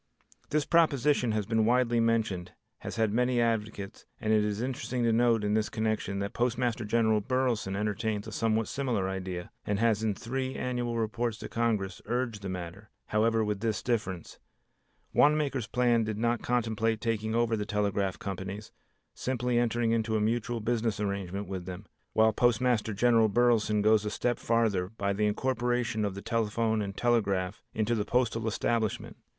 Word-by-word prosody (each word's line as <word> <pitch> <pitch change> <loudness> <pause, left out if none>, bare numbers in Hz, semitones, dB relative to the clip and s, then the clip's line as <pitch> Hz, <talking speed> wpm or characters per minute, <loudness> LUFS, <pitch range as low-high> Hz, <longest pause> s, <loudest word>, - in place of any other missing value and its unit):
This 150 -1 +1
proposition 145 -6 +3
has 105 -2 -1
been 110 +1 +1
widely 120 0 +3
mentioned, 110 -6 0 0.3
has - - -6
had 110 -2 +1
many 125 +1 +2
advocates, 110 -4 -2
and 110 -1 +1
it 105 -1 +4
is 105 0 -1
interesting 125 0 -2
to 115 -1 +3
note 115 -1 +3
in 105 0 +1
this 110 -1 +1
connection 110 -3 -1
that 100 0 -3
Postmaster 120 -1 0
General 110 -1 +2
Burleson 125 -5 0
entertains 105 0 -2
a 110 - -7
somewhat 110 +1 0
similar 120 -9 -1
idea, 95 -2 -5
and 105 -1 -1
has 110 -1 +2
in 110 -2 0
three 130 +5 -3
annual 120 -2 -2
reports 115 0 -1
to - - -7
Congress 110 -6 -1
urged 120 -4 -2
the 100 - -5
matter, 95 +3 -7 0.2
however, 110 +1 +2
with 105 -1 -2
this 110 0 -1
difference. 100 -8 -3 0.7
Wanamaker's 145 -5 +3
plan 120 -1 +2
did 110 -1 -3
not 120 +1 0
contemplate 115 -2 0
taking 110 -1 -1
over 115 -1 +2
the 105 - -2
telegraph 100 -2 -1
companies, 95 +2 -6 0.4
simply 125 -1 0
entering 120 -1 +1
into 110 -1 0
a - - +2
mutual 115 +2 -1
business 115 -1 0
arrangement 100 -1 -3
with 95 -2 -5
them, 95 +3 -7 0.3
while 110 0 +4
Postmaster 120 -2 +2
General 115 0 +4
Burleson 110 -2 +3
goes 110 0 +4
a 105 - -2
step 120 +3 -1
farther 110 -6 +1
by 100 -2 -2
the 105 +1 +1
incorporation 120 -1 0
of 100 -2 -2
the 100 - -7
telephone 110 -1 0
and 100 -1 -5
telegraph 100 -5 +1
into 110 +2 +1
the 110 -3 0
postal 115 0 0
establishment. 110 0 -1
110 Hz, 165 wpm, -29 LUFS, 105-120 Hz, 0.7 s, it